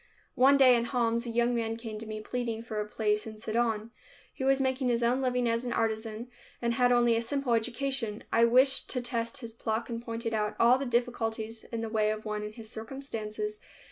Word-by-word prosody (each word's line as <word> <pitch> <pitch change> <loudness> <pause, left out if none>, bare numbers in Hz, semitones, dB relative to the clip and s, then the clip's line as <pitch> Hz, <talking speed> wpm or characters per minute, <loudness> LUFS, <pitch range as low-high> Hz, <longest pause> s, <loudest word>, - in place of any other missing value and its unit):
One 275 +2 +5
day 255 -2 +7
in 235 0 +1
Homs 235 -1 0
a - - -3
young 235 +1 +2
man 225 -1 -1
came 225 -2 -6
to 220 - -7
me, 215 0 -5
pleading 230 0 -3
for 220 -2 -3
a 210 - -4
place 210 0 0
in 215 -1 -8
Sidon. 220 0 -1 0.4
He - - -5
was 270 0 +3
making 260 0 0
his 240 -1 +1
own 245 +3 +2
living 250 -2 +1
as 230 +1 +1
an 245 - -2
artisan, 220 +1 -1 0.3
and 235 -1 0
had 245 +1 +3
only 240 -1 +4
a 230 - +1
simple 260 +1 -1
education. 230 -1 -1
I 230 +1 +6
wished 260 +3 +4
to 250 - 0
test 235 0 -2
his 230 -2 -7
pluck 225 +1 -3
and 230 0 -4
pointed 230 -1 -4
out 210 -1 0
all 245 +3 +6
the 275 - -2
difficulties 225 -2 -1
in 230 -1 -4
the 225 - -2
way 215 -1 +2
of 215 0 -3
one 210 -1 -2
in 210 0 -6
his 225 -1 -9
circumstances. 240 - -5
230 Hz, 220 wpm, -29 LUFS, 220-245 Hz, 0.4 s, day